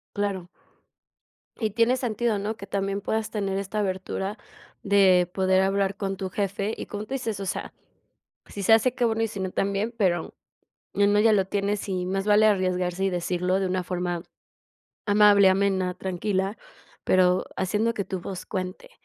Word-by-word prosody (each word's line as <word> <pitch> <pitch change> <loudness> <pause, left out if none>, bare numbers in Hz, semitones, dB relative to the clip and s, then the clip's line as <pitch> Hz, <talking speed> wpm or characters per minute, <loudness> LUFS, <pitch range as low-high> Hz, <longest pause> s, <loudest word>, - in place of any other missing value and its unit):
Claro. 195 -3 -2 1.1
Y 220 -1 0
tiene 235 +4 +2
sentido, 235 -3 -1
¿no?, 215 +2 -3
que 200 - -9
también 195 0 -2
puedas 220 +2 -2
tener 195 -2 -2
esta 200 +2 -4
abertura 190 +1 -3 0.4
de 190 -3 +4
poder 190 0 +2
hablar 195 0 0
con 195 -1 -3
tu 190 0 -4
jefe 200 +2 -2
y - - -6
como 205 0 -5
tú 270 - -5
dices, 230 -6 -3
o 195 - -4
sea, - - -4 0.7
si 200 - -7
se 225 - +4
hace, 240 +3 +2
qué 245 - 0
bueno 225 -1 +1
y 225 - +1
si 205 -2 -7
no, 190 -1 -2
también, 200 +4 -1
pero 180 -5 0 0.6
el 205 0 +3
no 205 - +4
ya 220 0 +5
lo 195 -2 +3
tienes, 200 +1 -2
y 185 -1 -1
más 195 +1 -2
vale 210 +1 +5
arriesgarse 185 -2 0
y - - +2
decirlo 180 +1 0
de 195 - 0
una 185 0 -1
forma 175 -1 -3 0.8
amable, 205 -1 +6
amena, 190 -1 +1
tranquila, 190 +2 -2 0.5
pero 185 0 +3
haciendo 210 +5 0
que 200 - -2
tu 190 -1 -4
voz 185 0 -6
cuente, 185 - -5
195 Hz, 175 wpm, -25 LUFS, 185-210 Hz, 1.1 s, amable